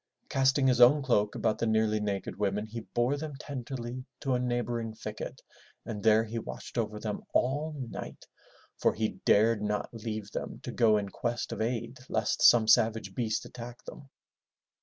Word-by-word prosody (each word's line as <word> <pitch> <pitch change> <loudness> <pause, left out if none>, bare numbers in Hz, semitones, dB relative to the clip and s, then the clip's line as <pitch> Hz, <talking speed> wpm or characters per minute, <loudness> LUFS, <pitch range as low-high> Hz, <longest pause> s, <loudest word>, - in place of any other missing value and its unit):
Casting 135 +1 +3
his 125 -2 +4
own 140 +4 +7
cloak 105 -5 +2
about 110 - 0
the 115 - 0
nearly 110 -1 +2
naked 100 -2 -3
women 105 +1 0
he 110 +2 -6
bore 120 +5 0
them 150 -1 -5
tenderly 130 -3 -6 0.2
to 135 -3 0
a 125 - +2
neighboring 120 -2 -2
thicket - - -7 0.4
and 110 -3 -5
there 110 0 +5
he 115 +1 -4
watched - - -8
over 105 -3 -1
them 105 -1 -4
all 145 +5 +1
night 125 -4 -7 0.5
for - - +2
he 110 0 -2
dared 110 +1 +4
not 105 +2 -2
leave 110 -2 -5
them - - -5
to - - -5
go 110 -2 +4
in 100 -1 -2
quest 120 +4 -3
of - - -4
aid 120 +2 -2
lest 110 -1 0
some 115 -2 +7
savage 110 -3 +3
beast 110 0 -1
attack 120 0 -9
them. 140 -2 -10
115 Hz, 175 wpm, -30 LUFS, 110-125 Hz, 0.5 s, own